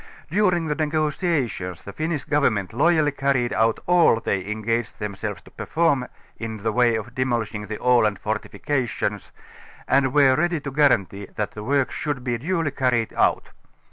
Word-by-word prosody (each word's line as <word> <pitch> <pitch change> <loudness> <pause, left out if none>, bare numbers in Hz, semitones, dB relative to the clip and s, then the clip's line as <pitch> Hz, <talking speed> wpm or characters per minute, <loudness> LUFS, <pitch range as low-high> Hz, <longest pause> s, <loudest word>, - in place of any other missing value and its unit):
During 180 -3 +2
the 150 - 0
negotiations 150 - -1
the 100 - -9
Finnish 155 +2 -2
Government 115 -10 +1
loyall,\' 155 +3 +3
carried 135 -4 +1
out 115 0 +2
all 175 -9 +4
they 95 -3 -2
engaged 110 +1 -2
themselves 105 -2 -5
to - - -17
perform 145 -6 0 0.3
in 115 -1 -4
the 110 +2 -2
way 120 0 +3
of 110 +2 -5
demolishing 115 -5 -2
the 110 +1 -4
Aland 120 -5 +3
fortifications, 120 +5 -3 0.6
and 135 -1 +3
were 135 -2 +5
ready 175 +2 +1
to 140 - -5
guarantee 105 -9 +2
that 105 - -2
the 105 - -8
work 140 +2 +1
should 145 -4 -3
be 120 -2 -1
duly 165 +1 -1
carried 125 -4 0
out. - - +1
125 Hz, 155 wpm, -23 LUFS, 110-150 Hz, 0.6 s, were